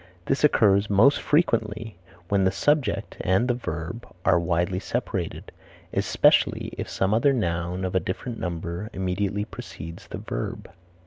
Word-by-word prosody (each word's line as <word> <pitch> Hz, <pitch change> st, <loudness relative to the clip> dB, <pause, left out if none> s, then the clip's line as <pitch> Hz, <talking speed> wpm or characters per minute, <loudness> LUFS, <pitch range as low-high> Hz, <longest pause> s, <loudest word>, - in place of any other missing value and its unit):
This 135 Hz, -, 0 dB
occurs 105 Hz, -8 st, +4 dB
most 110 Hz, +8 st, +5 dB
frequently 115 Hz, -, +1 dB, 0.3 s
when 100 Hz, 0 st, +2 dB
the 95 Hz, -, +4 dB
subject 125 Hz, -1 st, 0 dB
and 95 Hz, +7 st, +2 dB
the 125 Hz, -, +2 dB
verb 90 Hz, -1 st, -5 dB, 0.2 s
are 90 Hz, -, +5 dB
widely 90 Hz, +2 st, 0 dB
separated, 100 Hz, -6 st, -3 dB, 0.4 s
especially -, -, +3 dB
if -, -, -5 dB
some 95 Hz, +2 st, 0 dB
other 125 Hz, +6 st, +4 dB
noun 90 Hz, -4 st, -1 dB
of 90 Hz, -, -3 dB
a 95 Hz, -, +3 dB
different 115 Hz, +6 st, -5 dB
number 85 Hz, +3 st, -4 dB
immediately 95 Hz, +2 st, -1 dB
precedes 85 Hz, -5 st, -9 dB
the -, -, -6 dB
verb. -, -, -5 dB
100 Hz, 140 wpm, -25 LUFS, 90-115 Hz, 0.4 s, most